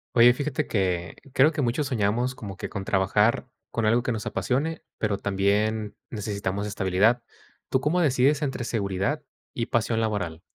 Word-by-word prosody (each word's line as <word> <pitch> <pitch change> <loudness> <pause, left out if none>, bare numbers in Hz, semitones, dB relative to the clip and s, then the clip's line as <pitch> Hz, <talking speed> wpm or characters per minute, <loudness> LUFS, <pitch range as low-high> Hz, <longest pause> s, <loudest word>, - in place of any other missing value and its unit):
Oye, 120 +1 +8
fíjate 140 +1 -2
que 90 -4 -1 0.2
creo 145 +4 +6
que 150 -2 -2
muchos 125 +4 0
soñamos 120 0 0
como 100 -6 -8
que - - -4
con 100 - -5
trabajar 100 +5 +2 0.2
con 115 - -1
algo 115 +3 +4
que 125 - -2
nos 110 -3 -3
apasione, 150 +6 -1 0.2
pero 105 -2 -1
también 105 +2 0
necesitamos 100 -2 -3
estabilidad. 100 +4 +2 0.5
¿Tú 130 - +2
cómo 155 +6 +1
decides 140 0 +3
entre 135 -4 -2
seguridad 105 +5 -1 0.3
y 115 - -2
pasión 115 -1 +1
laboral? 95 -8 -2
110 Hz, 160 wpm, -26 LUFS, 100-125 Hz, 0.5 s, Oye